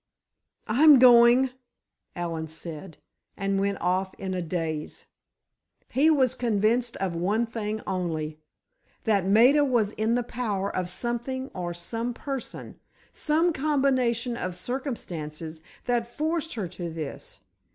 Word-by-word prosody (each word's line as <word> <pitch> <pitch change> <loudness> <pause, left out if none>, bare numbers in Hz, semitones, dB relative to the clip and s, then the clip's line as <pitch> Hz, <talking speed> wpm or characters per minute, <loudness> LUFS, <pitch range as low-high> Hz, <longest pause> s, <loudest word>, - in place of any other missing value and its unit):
"I'm 290 +6 +7
going," 245 +1 +7 0.6
Allen 165 -2 -3
said, 160 +1 -7 0.4
and 195 0 0
went 200 0 0
off 185 +2 0
in 190 -1 -4
a 180 - -2
daze. 160 -2 -4 0.8
He 290 +5 +3
was 265 -5 +3
convinced 235 +1 +1
of 190 -3 -2
one 205 +7 +1
thing 220 -2 -4
only. 160 -4 -3 0.6
That 200 -4 +2
Maida 245 +9 +6
was 240 -7 +2
in 220 +2 0
the 245 - +1
power 210 -5 -3
of 180 -1 -1
something 240 +6 -3
or 175 -2 -4
some 230 +7 -4
person—some 300 +4 -3
combination 260 -5 +1
of 180 -5 -4
circumstances 170 - -5 0.2
that 240 -1 0
forced 320 +4 -2
her 205 -6 -3
to 175 -1 -6
this. 160 -3 -7
220 Hz, 120 wpm, -26 LUFS, 180-250 Hz, 0.8 s, I'm